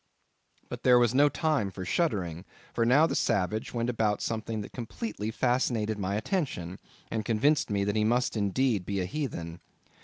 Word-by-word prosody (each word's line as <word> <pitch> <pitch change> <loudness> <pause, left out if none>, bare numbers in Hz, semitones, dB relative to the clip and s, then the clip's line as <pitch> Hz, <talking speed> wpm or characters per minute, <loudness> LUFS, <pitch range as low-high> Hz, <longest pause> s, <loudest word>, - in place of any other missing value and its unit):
But - - -7
there 125 -1 +6
was 120 -1 +3
no 145 +2 +5
time 150 -10 0
for 95 -1 -7
shuddering, 95 - -1 0.3
for 115 -1 +1
now 140 +6 +6
the - - -1
savage 100 +3 0
went 115 -1 -1
about 110 -4 0
something 110 -1 -3
that 100 - -8
completely 110 -3 -5
fascinated 115 -3 0
my 100 0 -1
attention, 105 - -2 0.3
and 110 -1 -1
convinced 130 +8 +2
me 100 -1 0
that 100 +1 -1
he 105 - +2
must 120 +3 +1
indeed 105 +1 +1
be 100 +1 -2
a 90 - -1
heathen. 90 - -5
110 Hz, 175 wpm, -29 LUFS, 100-125 Hz, 0.3 s, there